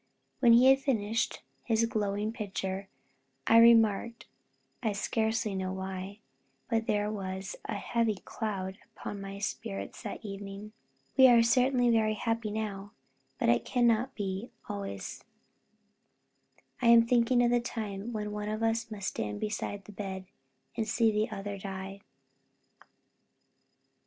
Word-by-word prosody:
When 235 -3 +6
he 240 +2 +7
had 270 - +4
finished 230 -5 -1 0.2
his 230 -1 +2
glowing 210 -1 -1
picture, 195 -3 -4 0.6
I 230 - +7
remarked 230 0 +5 0.6
(I 220 -4 0
scarcely 220 +1 0
know 190 -1 -2
why, 190 +2 -6 0.5
but 225 0 +1
there 210 -1 +1
was 190 -2 -5
a - - -3
heavy 225 +1 0
cloud 190 -2 -5 0.2
upon 200 - -6
my 195 0 -6
spirits 130 - -5
that - - -6
evening), 200 +1 -7 0.5
"We 265 -1 +9
are 235 -2 +7
certainly 245 +1 +3
very 215 -1 +2
happy 225 0 -1
now, 205 -2 -4 0.4
but - - +1
it 120 0 +3
cannot 240 +1 +2
be 195 +2 -3 0.2
so - - -4
always 100 -1 -6 1.6
I 240 - +3
am 235 0 +8
thinking 245 +1 +3
of 240 - +3
the 240 0 +3
time 215 -2 -5
when 210 -2 -3
one 210 0 -4
of 215 +1 -2
us 225 0 0
must 205 -3 -3
stand 105 -1 -4
beside 205 -1 -3
the - - -11
bed, 190 -2 -5 0.5
and 220 - -1
see 225 0 +3
the 215 +2 0
other 200 -1 -5
die." 195 0 -6
210 Hz, 140 wpm, -30 LUFS, 195-230 Hz, 1.6 s, We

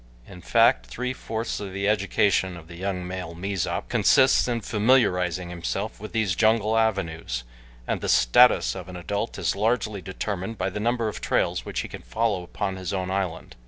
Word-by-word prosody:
In 90 - -12
fact - - +3
three 125 - -3
fourths 115 -2 -4
of 100 -2 -6
the 100 +1 -1
education 100 -3 +1
of 80 -1 -13
the 85 - -10
young 90 0 -3
male 90 -2 -6
Mezop 95 0 -2
consists 130 -1 +4
in 120 -1 -1
familiarizing 90 -7 +2
himself 95 +5 -4
with 110 +1 -8
these 110 -5 +1
jungle 110 0 +3
avenues, 85 - -1 0.4
and - - -2
the - - -2
status 65 - +5
of 95 -1 -8
an 90 - -8
adult 100 +5 -3
is - - 0
largely 110 -1 0
determined 95 +3 -4
by 95 - -1
the 105 - -4
number 115 +1 0
of 105 - -5
trails - - 0
which - - -3
he - - -6
can - - -9
follow 110 -4 -1
upon 95 +2 -4
his 95 0 -4
own 95 -1 -2
island. 95 -4 -3
100 Hz, 185 wpm, -25 LUFS, 90-110 Hz, 0.4 s, status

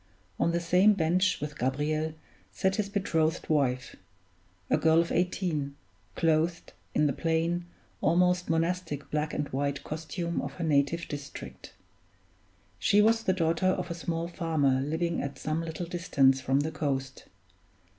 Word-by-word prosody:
On 170 - +2
the 170 - +1
same 180 +5 +4
bench 180 +1 +2
with 150 -1 -6
Gabriel 155 +5 -1 0.4
sat 190 +2 0
his 205 -2 -1
betrothed 165 -6 0
wife 130 -5 +1 0.7
a - - +3
girl 160 0 +4
of 170 - 0
eighteen 170 -5 -1 0.4
clothed 165 +1 +1 0.2
in 150 - +4
the 140 - +2
plain, 170 +3 0 0.3
almost 180 +2 +2
monastic 165 -3 -1
black 150 0 -1
and 145 - -2
white 140 +1 -2
costume 170 +2 -3
of - - -5
her 175 - -5
native 155 +2 +1
district. 145 -1 -8 1.1
She 205 - +4
was 225 +2 +4
the 190 -4 +1
daughter 170 0 +1
of 185 -1 0
a - - 0
small 165 0 -3
farmer 155 -7 +1
living 165 +3 -1
at 140 -1 -5
some 155 +2 -2
little 165 +1 -4
distance 140 -7 +2
from 135 +2 +2
the 155 +2 -2
coast. 135 -4 -3
160 Hz, 145 wpm, -29 LUFS, 145-175 Hz, 1.1 s, same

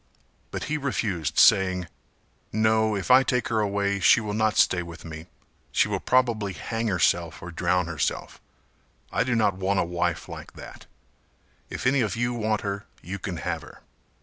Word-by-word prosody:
But - - -5
he 155 0 -2
refused 100 - -2
saying 95 -2 +5 0.7
"No, 110 0 +2
if 100 +5 -1
I 130 +1 +8
take 125 -2 0
her 110 -2 +1
away 100 -1 0
she 105 +5 +6
will 105 -2 -4
not 110 0 +1
stay 90 - +4
with 85 -1 -10
me, 80 0 -8 0.4
she - - +3
will - - -2
probably 115 -6 +1
hang 115 +4 -3
herself 85 -4 +1
or 90 - -8
drown 90 +1 +1
herself; 85 -3 -3 0.7
I 115 - +1
do 120 0 0
not 105 -4 +2
want 95 +1 0
a - - +3
wife 85 0 -2
like - - -9
that, - - -12 0.8
if - - -6
any 130 +1 +3
of 105 -5 -1
you 120 +1 0
want 110 -2 -1
her, 100 0 -4 0.2
you 95 +4 -5
can 90 -2 -5
have - - -3
her." - - -15
100 Hz, 175 wpm, -25 LUFS, 90-115 Hz, 0.8 s, I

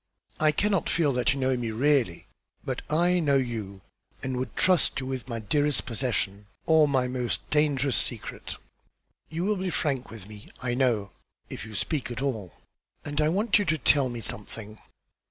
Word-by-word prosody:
I 155 0 +4
cannot 195 +3 +1
feel 155 -5 +2
that 125 +1 +2
you 135 - -2
know 130 0 +2
me 120 -2 -2
really; 120 - +1 0.4
but - - -2
I 175 +4 +3
know 145 -4 +2
you, 110 -7 -2 0.4
and 130 -1 -2
would 130 - -4
trust 185 -6 +3
you 130 - -5
with 130 -2 -4
my 115 - -2
dearest 145 +7 +1
possession, 105 -5 -2 0.2
or 160 -2 +5
my 130 -3 +2
most 125 -1 -2
dangerous 145 -5 +2
secret. - - -2 0.7
You 165 +2 -3
will 210 0 +1
be 185 0 -2
frank 140 -7 0
with 110 -4 -10
me, 105 -1 -12
I 125 -1 -1
know, 120 -6 +1 0.4
if - - -6
you 110 - -9
speak 150 +1 -1
at 120 -2 -5
all; 110 - -3 0.5
and 145 +1 -1
I 150 - +3
want 205 +5 +3
you 205 - 0
to 160 -2 +1
tell 140 -1 +3
me 120 -1 -5
something." 110 +1 -5
130 Hz, 180 wpm, -27 LUFS, 115-150 Hz, 0.7 s, or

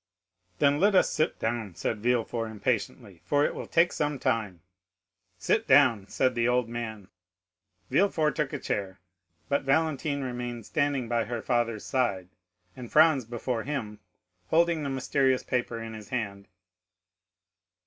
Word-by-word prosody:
"Then 140 +5 +3
let 200 +1 +4
us 185 - +4
sit 155 - 0
down," 110 -5 -3
said 110 +5 -2
Villefort 115 0 0
impatiently, 100 -4 -3
"for 145 0 +2
it - - -1
will - - -6
take 170 +1 +3
some 150 -1 -1
time." 105 -9 -2 0.7
"Sit - - 0
down," 100 -4 +5
said 130 - +1
the 120 -1 +1
old 125 -1 +2
man. 110 -4 -6 0.8
Villefort 165 -6 +2
took 150 -3 -1
a 145 - -3
chair, 100 -7 -3 0.5
but 140 - +1
Valentine 140 0 0
remained 120 -3 -5
standing 145 -5 0
by 120 0 0
her 120 0 -4
father's 120 -3 0
side, 100 -9 -1 0.5
and 125 -2 -9
Franz 155 -5 +5
before 120 0 -3
him, 110 -6 -4 0.5
holding 170 - +2
the 140 - -3
mysterious 130 0 +1
paper 120 -2 -2
in 115 0 -7
his 105 -2 -10
hand. 100 -5 -4
120 Hz, 145 wpm, -28 LUFS, 110-140 Hz, 0.8 s, down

